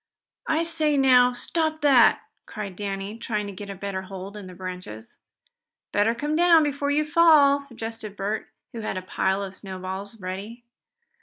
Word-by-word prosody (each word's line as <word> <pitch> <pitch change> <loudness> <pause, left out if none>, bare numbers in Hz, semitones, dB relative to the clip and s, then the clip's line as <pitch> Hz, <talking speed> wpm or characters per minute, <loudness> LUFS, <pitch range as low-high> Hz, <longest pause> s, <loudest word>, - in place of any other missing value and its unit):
"I 320 +1 +2
say 315 -3 0
now, 250 -2 +6
stop 315 +5 -2
that!" 270 -5 +5 0.3
cried 200 -4 -6
Danny, 200 +2 -5
trying 215 -3 -2
to 200 - -7
get 200 +1 -8
a 195 - -5
better 195 0 -4
hold 190 +1 -8
in 205 -3 -8
the 180 - -11
branches. 180 - -8 0.7
"Better 210 +3 +2
come 295 +4 -2
down 335 -1 +6
before 285 -1 -1
you 300 +1 +2
fall," 300 -3 +5
suggested 225 -6 -7
Bert, 205 +2 -3 0.3
who 230 - -6
had 215 - -3
a 185 - -5
pile 190 +1 0
of 195 -1 -6
snowballs 190 +2 -7
ready. 200 +6 -7
215 Hz, 165 wpm, -25 LUFS, 195-285 Hz, 0.7 s, now